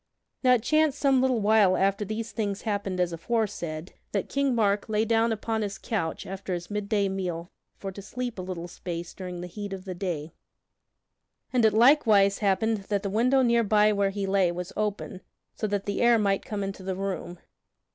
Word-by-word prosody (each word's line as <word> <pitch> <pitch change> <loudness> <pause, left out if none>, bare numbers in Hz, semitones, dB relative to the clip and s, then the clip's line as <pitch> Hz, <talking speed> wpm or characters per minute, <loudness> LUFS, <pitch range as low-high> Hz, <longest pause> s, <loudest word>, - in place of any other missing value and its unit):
Now 250 -1 +6
it 225 - -2
chanced 310 +1 +2
some 275 -3 +3
little 255 -3 +2
while 205 -3 +4
after 195 +2 +1
these 220 +2 -4
things 205 -2 -3
happened 200 -4 -2
as 175 -1 +1
aforesaid, 175 -4 -3 0.2
that 200 - -1
King 275 -2 +1
Mark 205 -2 +1
lay 215 +1 +1
down 225 +1 +2
upon 220 0 -2
his 205 -1 -3
couch 180 -8 -3
after 190 -1 -4
his 175 +2 -7
midday 205 0 0
meal 180 -3 -4 0.3
for 195 - -5
to 200 - -9
sleep 240 +1 -5
a - - -2
little 180 -2 -5
space 175 -1 -6
during 180 -2 -6
the - - -5
heat 205 +2 -6
of 190 0 -7
the 185 - -4
day; 170 -4 -4 1.2
and 245 -3 +4
it 215 - +4
likewise 220 -5 +5
happened 215 +2 +2
that 200 0 -1
the 200 - -2
window 255 +5 +3
near 235 -1 +3
by 210 0 +4
where 200 -1 +2
he 195 0 -3
lay 190 -2 +2
was 180 +1 -6
open 210 -2 -3 0.3
so 215 - -2
that 205 -1 -2
the 200 - -2
air 240 -1 +5
might 200 -2 +1
come 205 -2 -3
into 195 0 -5
the 190 0 -3
room. 190 -2 -4
200 Hz, 195 wpm, -27 LUFS, 190-225 Hz, 1.2 s, Now